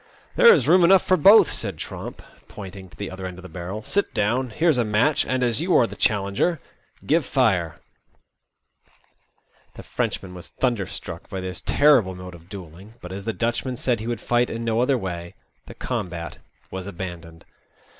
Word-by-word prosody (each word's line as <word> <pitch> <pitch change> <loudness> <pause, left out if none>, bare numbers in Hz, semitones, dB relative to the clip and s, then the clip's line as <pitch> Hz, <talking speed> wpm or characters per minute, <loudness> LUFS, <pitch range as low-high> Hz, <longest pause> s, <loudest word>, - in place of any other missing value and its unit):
There 475 -2 +8
is 465 - +3
room 180 +1 +6
enough 190 +2 +5
for 185 - +4
both," 200 +6 +7
said - - -3
Tromp, - - -7 0.2
pointing 95 -2 -10
to - - -19
the 100 -2 -5
other 95 0 -6
end 90 -1 -8
of 90 - -12
the - - -8
barrel. 95 +4 -6
Sit 200 - -1
down. 120 +5 0
Here's 155 +2 +2
a - - +3
match, 115 +8 +2
and, 130 0 0
as 120 +2 +2
you 180 +1 +1
are 120 - +5
the - - -8
challenger, 100 - 0 0.5
give 160 +2 +2
fire." 95 - +1 2.0
The - - -10
Frenchman 90 -1 -3
was 90 -2 -10
thunderstruck 100 -8 -3
by 95 - -4
this 90 -1 -5
terrible 130 -11 +3
mode 90 0 -9
of 85 0 -15
duelling, 95 +2 -11
but, 90 - -9
as 100 +1 -7
the 115 - 0
Dutchman 120 +3 -2
said 120 -1 -1
he 110 - -6
would 120 -1 -2
fight 120 0 +1
in 115 +1 -4
no 115 0 +1
other 130 +1 +2
way, 85 -4 -6 0.3
the - - -10
combat 85 -2 -5 0.3
was 95 0 -6
abandoned. 85 -3 -8
105 Hz, 185 wpm, -23 LUFS, 90-125 Hz, 2.0 s, There